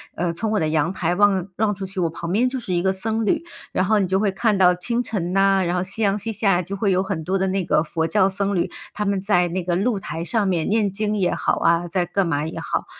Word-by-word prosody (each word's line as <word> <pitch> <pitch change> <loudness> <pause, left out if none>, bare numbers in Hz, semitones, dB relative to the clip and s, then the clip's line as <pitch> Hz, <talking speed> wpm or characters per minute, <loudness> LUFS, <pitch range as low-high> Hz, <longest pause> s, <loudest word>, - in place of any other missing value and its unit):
呃， 175 0 -1
从 215 +7 -3
我 215 - +1
的 155 - +1
阳 160 +3 0
台 175 -2 -1
望 195 -1 +2
望 210 -1 +1
出 195 0 -5
去， 190 0 -7
我 170 -2 +1
旁 170 +1 -6
边 230 +7 +2
就 260 +1 -3
是 230 -7 -4
一 175 - +1
个 190 +1 +1
僧 220 +3 0
侣。 330 +7 +1 0.3
然 - - +1
后 215 +3 +2
你 195 - +1
就 190 +1 +1
会 200 0 +1
看 210 +2 +1
到 180 -1 +5
清 235 +7 -1
晨 185 -7 -3
呐， 195 0 +3
然 175 +1 -1
后 180 - 0
夕 190 +4 -2
阳 200 -1 +2
西 215 +2 -3
下 195 -4 +2
就 195 +3 -6
会 200 0 0
有 185 0 +2
很 190 -4 -3
多 190 +3 0
的 190 0 0
那 190 -1 -1
个 155 - +2
佛 160 0 -2
教 195 +1 +3
僧 200 +1 -1
侣， 175 - 0 0.2
他 210 - -3
们 200 -1 0
在 180 -3 +2
那 185 +2 -2
个 175 0 -1
露 205 +3 0
台 165 -2 -5
上 210 +3 0
面 175 -4 0
念 210 -1 +2
经 210 +1 -1
也 185 -3 +1
好 - - 0
啊、 170 +1 +2
在 180 +1 0
干 185 +2 0
嘛 150 -3 -1
也 160 - -7
好， - - -2
190 Hz, 305 characters per minute, -22 LUFS, 175-205 Hz, 0.3 s, 到